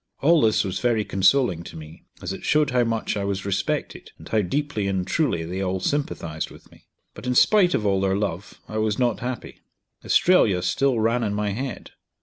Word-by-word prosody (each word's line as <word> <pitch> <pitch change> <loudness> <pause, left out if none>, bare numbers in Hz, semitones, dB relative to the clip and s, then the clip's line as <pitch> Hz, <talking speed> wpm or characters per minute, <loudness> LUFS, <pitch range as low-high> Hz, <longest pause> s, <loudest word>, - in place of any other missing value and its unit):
All 160 +2 +5
this 110 -1 +3
was 95 -1 -3
very 115 -4 +1
consoling 95 -2 +2
to 85 - -10
me, 80 +1 -12 0.2
as 90 - -3
it - - -9
showed 150 -2 +2
how 125 -1 +3
much 115 -2 -1
I 100 - -2
was 100 -1 -3
respected, 100 -1 -2
and - - -13
how 110 - +1
deeply 125 0 -2
and 95 -2 -1
truly 125 - 0
they 90 +3 -4
all 95 0 -1
sympathised 85 - -2
with - - -16
me. - - -21 0.3
But - - -9
in 125 - 0
spite 190 - +5
of 105 - -1
all 95 -1 +2
their 95 0 +1
love 100 -2 -4
I 110 - -3
was 110 -1 0
not 120 -3 +1
happy; 125 0 -6 0.4
Australia 105 - +3
still 130 +5 +1
ran 115 +2 +1
in 105 -2 -1
my 105 -1 -1
head. 130 +6 -5
105 Hz, 205 wpm, -24 LUFS, 95-125 Hz, 0.4 s, All